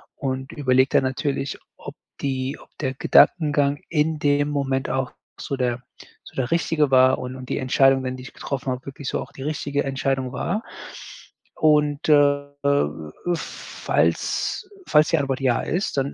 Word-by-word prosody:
und 130 Hz, -1 st, -3 dB
überlege 130 Hz, -1 st, +2 dB
dann -, -, +4 dB
natürlich, 135 Hz, +1 st, -2 dB, 0.2 s
ob -, -, -9 dB, 0.3 s
die 135 Hz, 0 st, -2 dB
ob -, -, -18 dB
der 130 Hz, -3 st, -1 dB
Gedankengang 145 Hz, 0 st, +4 dB
in 155 Hz, -1 st, +1 dB
dem 145 Hz, 0 st, +2 dB
Moment 135 Hz, -2 st, -1 dB
auch 130 Hz, -1 st, -1 dB, 0.3 s
so 140 Hz, -, -3 dB
der 125 Hz, -1 st, -1 dB, 0.4 s
so -, -, -15 dB
der 130 Hz, -2 st, -2 dB
richtige 160 Hz, -4 st, +1 dB
war 130 Hz, 0 st, +6 dB
und 125 Hz, 0 st, -6 dB
und 130 Hz, -1 st, -9 dB
die -, -, -1 dB
Entscheidungen, 130 Hz, 0 st, +3 dB
die 125 Hz, -, -9 dB
ich 135 Hz, -, -11 dB
getroffen 135 Hz, -1 st, -4 dB
habe, 125 Hz, +1 st, -5 dB
wirklich 140 Hz, 0 st, -8 dB
so -, -, -1 dB
auch -, -, -9 dB
die 135 Hz, -, -9 dB
richtige 145 Hz, -1 st, -1 dB
Entscheidung 135 Hz, -1 st, -1 dB
war. 195 Hz, -, -2 dB, 0.9 s
Und, 150 Hz, -1 st, +2 dB
äh 145 Hz, -1 st, +5 dB, 0.2 s
äh, 140 Hz, -, +4 dB, 0.5 s
falls 400 Hz, -, -1 dB, 0.2 s
falls 150 Hz, -2 st, +4 dB
die 165 Hz, -, +3 dB
Antwort 135 Hz, -1 st, -1 dB
ja 125 Hz, -3 st, +2 dB
ist, 180 Hz, -2 st, -2 dB
dann 135 Hz, +1 st, 0 dB
135 Hz, 165 wpm, -23 LUFS, 130-145 Hz, 0.9 s, war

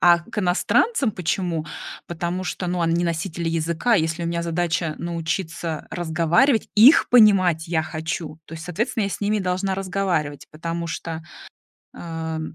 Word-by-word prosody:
А 175 Hz, -1 st, +6 dB
к 170 Hz, -, -8 dB
иностранцам 215 Hz, -, +2 dB
почему? 175 Hz, -2 st, -2 dB, 0.4 s
Потому 175 Hz, +2 st, -3 dB
что, 180 Hz, -, -3 dB
ну, 180 Hz, 0 st, -1 dB
они 170 Hz, +1 st, +1 dB
носители 170 Hz, 0 st, -2 dB
языка, 165 Hz, +8 st, +1 dB
если 165 Hz, -2 st, 0 dB
у -, -, -1 dB
меня 170 Hz, 0 st, -1 dB
задача 170 Hz, -1 st, -1 dB
научиться 170 Hz, -1 st, -3 dB
разговаривать, 175 Hz, -, +2 dB
их 245 Hz, +10 st, +7 dB
понимать 185 Hz, -9 st, +5 dB
я 160 Hz, -2 st, +1 dB
хочу, 155 Hz, 0 st, -5 dB
то 165 Hz, -, -9 dB
есть, 160 Hz, 0 st, -8 dB
соответственно, 220 Hz, +6 st, -1 dB
я 200 Hz, -, -2 dB
с -, -, -5 dB
ними 210 Hz, +1 st, +1 dB
должна 190 Hz, 0 st, -1 dB
разговаривать, 185 Hz, -6 st, -2 dB
потому 165 Hz, +2 st, -4 dB
что, 165 Hz, 0 st, -5 dB, 0.7 s
ам, 160 Hz, -1 st, -5 dB
170 Hz, 150 wpm, -23 LUFS, 160-190 Hz, 0.7 s, их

